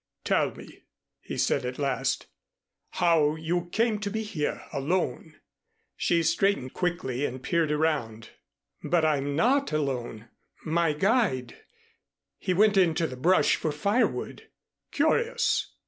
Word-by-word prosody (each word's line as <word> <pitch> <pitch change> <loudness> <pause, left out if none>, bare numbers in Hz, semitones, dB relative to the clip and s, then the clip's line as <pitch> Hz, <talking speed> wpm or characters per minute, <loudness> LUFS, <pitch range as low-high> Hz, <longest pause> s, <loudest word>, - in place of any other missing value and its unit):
"Tell - - +2
me," - - -13 0.4
he - - -7
said 140 - +1
at 125 0 -4
last, 140 -2 -1 0.7
"how 160 -4 +3
you 170 +2 -2
came 220 +3 0
to 205 -1 -3
be 220 +2 -3
here 180 -9 -3
alone." 155 +2 -2 0.6
She 170 -1 +1
straightened 165 -5 +1
quickly 170 -8 -2
and 130 -2 -4
peered 165 -3 +1
around. 140 -8 -1 0.5
"But 170 -2 +2
I'm 145 -2 0
not 265 - +2
alone 125 -7 -3 0.4
my 165 0 +1
guide 150 - +1 0.8
he - - -2
went 205 +2 +4
into 170 -3 +3
the 130 - -5
brush 175 +9 +3
for 155 - -2
firewood." 200 +11 -1 0.4
"Curious!" 455 +11 +1
160 Hz, 125 wpm, -27 LUFS, 140-190 Hz, 0.8 s, went